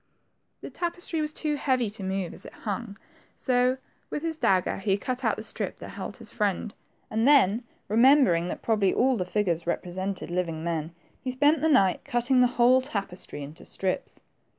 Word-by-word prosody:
The - - -8
tapestry 345 -2 -3
was 305 0 -2
too 305 0 -2
heavy 255 -5 +1
to 210 - -6
move 190 -2 -2
as - - -13
it - - -11
hung, 205 0 -4 0.4
so 250 0 +2 0.3
with 300 - -4
his 325 -1 -1
dagger 185 - +2
he 195 0 +1
cut 255 +5 -4
out 220 -3 +2
the - - -6
strip - - -3
that - - -9
held - - -7
his - - -11
friend, 205 0 -1 0.4
and 225 +3 +2
then 250 -6 +5 0.2
remembering 230 - +5
that - - -5
probably 215 -4 +2
all 260 +1 +3
the 185 -5 -2
figures 175 -4 -1
represented 185 +2 -3
living 170 -3 -2
men, 165 -1 -3 0.3
he 260 - -3
spent 290 +4 +3
the 320 - +3
night 195 - +4
cutting 245 +2 +2
the 250 - +6
whole 250 +2 +6
tapestry 195 - -5
into 150 +5 -10
strips. 190 -1 -3
220 Hz, 180 wpm, -27 LUFS, 185-260 Hz, 0.4 s, the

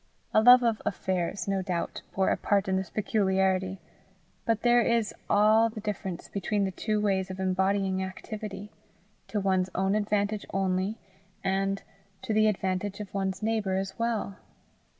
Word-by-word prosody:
A 215 - +6
love 245 +2 +8
of 230 -2 +1
affairs, 190 -2 -2
no 195 -1 0
doubt, 180 -3 -3
bore 190 0 +2
a - - +3
part 200 -2 +1
in 190 - +1
this 190 -1 -2
peculiarity, 190 -3 +1 0.7
but 225 -2 0
there 240 0 +5
is 230 -2 +1 0.2
all 215 +2 +5
the 220 -1 -8
difference 195 -4 -4
between 200 +1 -1
the 190 - 0
two 215 +3 -1
ways 195 -3 0
of 185 0 -7
embodying 190 0 +1
activity 205 +1 -7 0.6
to 210 - -2
one's 190 -1 +1
own 190 +1 +1
advantage 210 0 0
only, 190 +2 0 0.5
and 195 +1 0 0.4
to 220 - -1
the 215 0 +4
advantage 190 0 -1
of 210 -2 -7
one's 195 0 -2
neighbour 215 -4 0
as 190 0 -3
well. 225 -4 -1
195 Hz, 155 wpm, -28 LUFS, 190-215 Hz, 0.7 s, love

